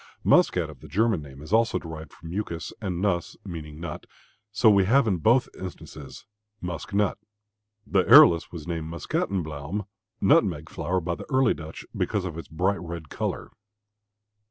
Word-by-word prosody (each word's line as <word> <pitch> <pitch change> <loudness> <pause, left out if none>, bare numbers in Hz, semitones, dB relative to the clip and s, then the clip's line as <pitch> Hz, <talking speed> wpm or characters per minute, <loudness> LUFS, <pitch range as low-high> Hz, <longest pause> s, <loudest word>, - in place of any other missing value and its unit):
"Muskat" - - +4
of - - -12
the - - -12
German 110 -3 +1
name 70 -1 -11
is 80 - -7
also 115 -4 +3
derived 80 -3 -8
from 80 - -11
"muscus" 85 -4 -4
and 95 -3 -3
"nuss" 90 -4 -1
means 80 -5 -7
nut, 85 - -6 0.4
so 110 +2 +3
we 100 -3 +6
have 130 +6 +4
in 100 -5 +1
both 115 +9 +3
instances 75 -6 -9 0.3
"musk 90 +1 -6
nut." 100 0 +1 0.7
The 95 -2 +2
arillus 120 - +7
was 80 -4 -8
named 80 -2 -4
Muscatenbluome 85 +2 -3 0.3
(nutmeg 80 -3 +3
flower) 90 +1 -1
by 85 +1 -2
the - - -8
early 130 -3 +4
Dutch 80 0 -9
because 100 -3 -1
of 85 -4 -5
its 85 -3 -7
bright 90 +6 0
red 85 -3 -7
color. - - -4
90 Hz, 160 wpm, -26 LUFS, 80-100 Hz, 0.7 s, arillus